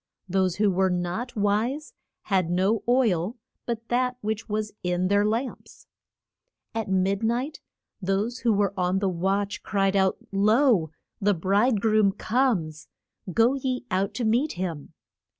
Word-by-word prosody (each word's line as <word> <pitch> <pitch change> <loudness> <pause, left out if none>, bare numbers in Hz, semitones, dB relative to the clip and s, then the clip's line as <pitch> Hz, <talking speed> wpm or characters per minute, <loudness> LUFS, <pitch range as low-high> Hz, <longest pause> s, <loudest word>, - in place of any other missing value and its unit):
Those 185 -1 +1
who 205 -1 +2
were 190 +1 +2
not 180 +7 -3
wise 225 - 0 0.3
had 185 -4 +1
no 190 +5 +1
oil 225 -4 +2 0.3
but 230 -1 -4
that 250 +1 +1
which 220 +1 -3
was 210 0 -2
in 180 +1 0
their 200 0 +3
lamps. 230 +5 -3 0.9
At 220 -2 -3
mid 190 +1 +1
night 245 +7 -1 0.4
those 200 +6 -1
who 235 - +2
were 200 -2 +1
on 180 0 +1
the 195 0 0
watch 195 +3 -1
cried 195 -1 0
out, 190 -1 +2
Lo, 210 - +3 0.3
the 205 0 +3
bride 200 +6 +2
groom 215 -2 +3
comes! 205 - 0 0.4
Go 230 +7 +4
ye 260 -2 -2
out 195 +2 0
to 245 - -1
meet 245 +8 +2
him. 170 -5 -5
205 Hz, 145 wpm, -26 LUFS, 190-235 Hz, 0.9 s, Go